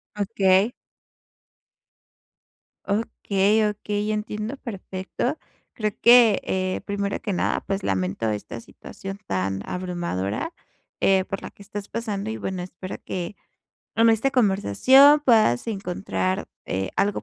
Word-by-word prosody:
Okey. 200 0 +3 2.1
Okey, 205 0 +1
okey, 210 0 -2
entiendo 215 +3 -3
perfecto. 200 +5 -4 0.4
Creo 215 -2 -1
que, 235 -3 +7
eh, 185 0 -1
primero 200 -1 -2
que 205 - -3
nada, - - 0
pues 195 0 -2
lamento 95 +3 -1
esta 105 +2 -4
situación 195 - -9
tan 95 0 -1
abrumadora, 175 - -3 0.5
eh, 190 -1 +4
por 195 - -5
la - - -8
que 200 - -15
estás 205 0 -7
pasando, 215 -2 -3
y 220 - -3
bueno, 185 -2 -4
espero 185 +1 -7
que 180 +2 -4 0.6
con 230 0 +5
esta 225 +5 +2
conversación 255 - +5
puedas 215 - +4
encontrar, 195 -1 -2 0.2
eh, 95 0 -2
algo 205 0 +1
200 Hz, 120 wpm, -24 LUFS, 185-215 Hz, 2.1 s, que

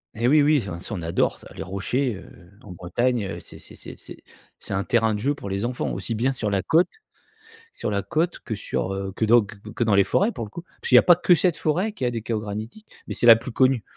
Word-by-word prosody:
Et 115 +2 0
oui, 150 +2 +5
oui, 145 -4 +3
oh, 85 -1 -6
ça 105 +4 -6
on 85 - -6
adore 85 - 0
ça, - - -14
les - - -7
rochers, 110 +6 -2
heu, - - -12 0.3
en 100 - -11
Bretagne 110 +6 -1
heu, - - -6
c'est - - -13
c'est - - -14
c'est - - -10
c'est - - -13 0.3
c'est - - -6
un 95 +1 0
terrain 115 -2 +2
de 105 - -3
jeu 140 +6 0
pour 100 - -8
les 100 +4 -1
enfants 120 0 -3
aussi 115 - -4
bien 130 +5 0
sur 110 -5 -3
la 100 -1 0
côte 165 +3 +3 0.8
sur - - -4
la 100 -1 0
côte 160 - -1
que 110 - -5
sur, 95 -2 -3
heu 95 0 -4
que 110 - 0
dans 115 +2 +6
q 105 0 -13
q - - -10
que 120 - +1
dans 110 -3 +1
les 100 0 +5
forêts 205 - +1
pour 115 - -5
le - - -11
coup. 170 +9 -9 0.2
Puisqu'il - - +2
y - - +11
a - - +7
pas 175 - +7
que 175 0 +4
cette 175 -1 +1
forêt 180 +8 0
qui 205 - -8
a 125 - +2
des 115 -2 -5
chaos 115 -2 -2
granitiques, 110 - -7 0.2
mais - - -4
c'est 120 - +1
la 115 - +11
plus 115 +2 -6
connue. 130 -3 +2
115 Hz, 280 wpm, -24 LUFS, 100-135 Hz, 0.8 s, y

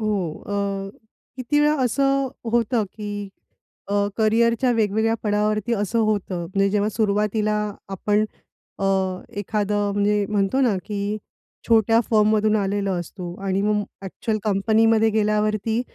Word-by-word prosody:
हो. 215 -1 0 0.3
अ, 200 -1 -2 0.5
किती 265 +3 +1
वेळा 300 +1 +4
असं 275 +2 +1 0.2
होतं 235 -1 +2
की, 210 -1 -6 0.8
अ, 200 0 +1
करियरच्या 230 +3 +2
वेगवेगळ्या 220 0 +1
पडावावरती 210 +2 0
असं 210 +2 -1
होतं, 205 -5 0
म्हणजे 195 +2 +1
जेव्हा 210 +1 +1
सुरुवातीला 210 0 +1 0.3
आपण 205 +2 +1 0.5
अ, 195 - -2 0.6
एखादं 205 0 -1
म्हणजे 205 0 +1
म्हणतो 205 +5 +1
ना, 245 -6 +3
की 205 0 -2 0.5
छोट्या 225 0 +4
फर्ममधून 215 -1 +3
आलेलो 200 -1 0
असतो 175 +1 -7
आणि 195 0 0
मग 210 +1 +2 0.3
अ‍ॅक्चुअल 215 +3 -3
कंपनीमध्ये 220 +2 +3
गेल्यावरती 215 +1 +1
210 Hz, 120 wpm, -23 LUFS, 200-225 Hz, 0.8 s, वेळा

